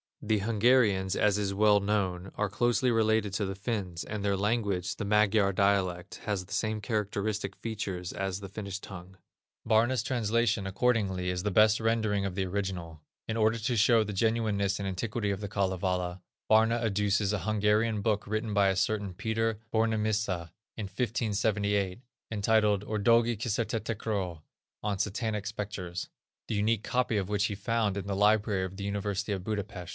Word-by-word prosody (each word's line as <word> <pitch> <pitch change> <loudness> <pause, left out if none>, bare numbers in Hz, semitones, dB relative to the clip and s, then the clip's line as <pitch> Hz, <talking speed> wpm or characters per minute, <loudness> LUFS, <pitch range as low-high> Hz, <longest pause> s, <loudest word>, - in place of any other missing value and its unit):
The 105 -1 +1
Hungarians, 105 -3 +3
as 105 -1 +3
is 100 -1 -1
well 105 +1 +5
known, 95 -3 -1
are 105 -1 0
closely 120 +4 +2
related 110 -3 +2
to 100 +1 0
the 95 0 -4
Finns, 95 -5 -3
and 105 -1 -5
their 100 -1 +1
language, 100 -3 0
the 110 - -4
Magyar 105 -1 +3
dialect, 95 -2 0
has 100 -3 -2
the - - -9
same 110 -1 -1
characteristic 105 -2 -2
features 100 -6 -4
as 95 0 -3
the 100 -1 -8
Finnish 100 -1 -5
tongue. 95 -1 -10 0.5
Barna's 120 +3 +3
translation, 115 -4 +1
accordingly, 95 -4 +1
is 90 0 -1
the 105 - -1
best 110 +2 +5
rendering 110 -3 +1
of 95 -2 -3
the 95 -1 0
original. 90 -5 -4 0.3
In 110 - -2
order 110 +1 +3
to 120 +3 -1
show 115 +1 +5
the 105 -1 -5
genuineness 105 -2 +1
and 100 - -3
antiquity 105 +2 -2
of 100 - -3
the 105 - -3
Kalevala, 95 -2 -1 0.3
Barna 115 +2 +4
adduces 105 -1 +1
a 105 - 0
Hungarian 105 +2 +1
book 105 -1 0
written 110 +1 -2
by 100 -1 +4
a 95 - +1
certain 100 0 0
Peter 110 +2 -1
Bornemissza, 110 -6 0 0.3
in 110 - -3
1578, 105 -3 0 0.3
entitled 105 -1 +2
Ördögi 115 +2 +3
Kisertetekröl 105 -5 -2 0.4
(on 100 -2 -1
Satanic 105 0 -2
Specters), 100 -4 -5 0.4
the - - -2
unique 105 +1 +1
copy 125 -3 0
of 100 -1 -2
which 100 -1 +1
he 100 - -2
found 105 0 0
in 100 - -4
the 100 - -1
library 105 -1 +3
of 95 0 -6
the 100 - -5
University 100 0 -2
of 95 -3 -2
Budapest. 100 -4 -4
105 Hz, 165 wpm, -29 LUFS, 95-110 Hz, 0.5 s, well